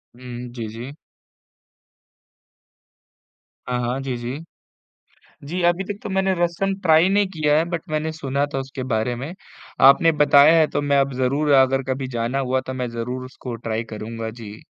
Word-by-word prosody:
हुँ, 125 0 -8
जी, 115 -3 -5
जी। 115 +5 -8 2.8
हाँ, 125 0 -1
हाँ, 125 +2 -2
जी, 135 -2 -3
जी। 125 +5 -5 1.1
जी, 180 +4 -3
अभी 175 +2 +2
तक 200 - -13
तो - - -5
मैंने 190 0 +1
रसम 175 +3 0
ट्राई 160 +1 +5
नहीं 200 +1 +3
किया 150 -4 +1
है, 160 - +2
बट 170 -2 -2
मैंने 155 +1 -2
सुना 140 -2 -1
था - - 0
उसके 135 0 -6
बारे 110 +3 0
में। 135 +7 -6 0.6
आपने 165 +4 +5
बताया 145 +3 +7
है 160 - +5
तो - - -1
मैं 140 -1 +2
अब 135 0 0
ज़रूर 135 +4 0
अगर 135 +1 +1
कभी 130 0 -4
जाना 115 +4 -1
हुआ, 130 -1 0
तो 130 0 -7
मैं 125 -1 -3
ज़रूर 125 +2 -4
उसको 130 -1 -8
ट्राई 115 0 -3
करूँगा, 110 +1 -5
जी। 110 -2 -10
135 Hz, 170 wpm, -22 LUFS, 120-155 Hz, 2.8 s, बताया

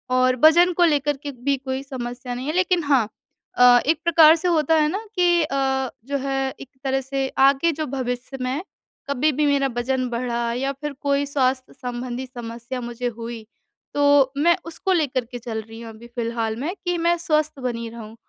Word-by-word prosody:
और 255 0 +3
वजन 345 +3 +7
को 350 - +2
लेकर 290 -3 +1
के 285 - -4 0.2
भी 280 - +4
कोई 265 0 -4
समस्या 245 -2 -6
नहीं 255 +3 -5
है 305 - -1
लेकिन 365 -1 +2
हाँ 275 -7 +3 0.5
अ, 245 0 +7
एक 315 +2 +2
प्रकार 325 -2 +7
से 335 +2 -2
होता 320 -2 +3
है 305 -1 +3
ना, 400 +7 -4
कि 350 -1 +3
अ, 265 -2 0 0.2
जो 280 +1 -1
है 270 0 0 0.2
एक 265 - -10
तरह 270 0 0
से 270 0 -2 0.2
आगे 280 +5 +3
जो - - 0
भविष्य 255 +1 -4
में 255 +4 -2 0.5
कभी 280 +3 +2
भी 295 +2 0
मेरा 280 -1 +2
वजन 255 +1 0
बढ़ा 235 -1 -2
या 270 +3 -1
फिर 295 -1 -3
कोई 280 0 +1
स्वास्थ्य 260 -2 -1
संबंधी 250 0 -5
समस्या 240 0 -7
मुझे 240 +1 -4
हुई 230 -1 -7 0.5
तो 285 -2 +4
मैं 340 +4 +4
उसको 335 +3 -2
लेकर 275 -7 0
के 245 +1 -8
चल 225 -1 -4
रही 225 0 -11
हूँ 230 - -8
अभी 230 +2 -13
फ़िलहाल 230 -2 -2
में 315 +7 -2
कि 355 0 0
मैं 345 0 +3
स्वस्थ 310 -3 0
बनी 235 -2 -3
रहूँ। 225 -1 -10
270 Hz, 195 wpm, -22 LUFS, 245-300 Hz, 0.5 s, वजन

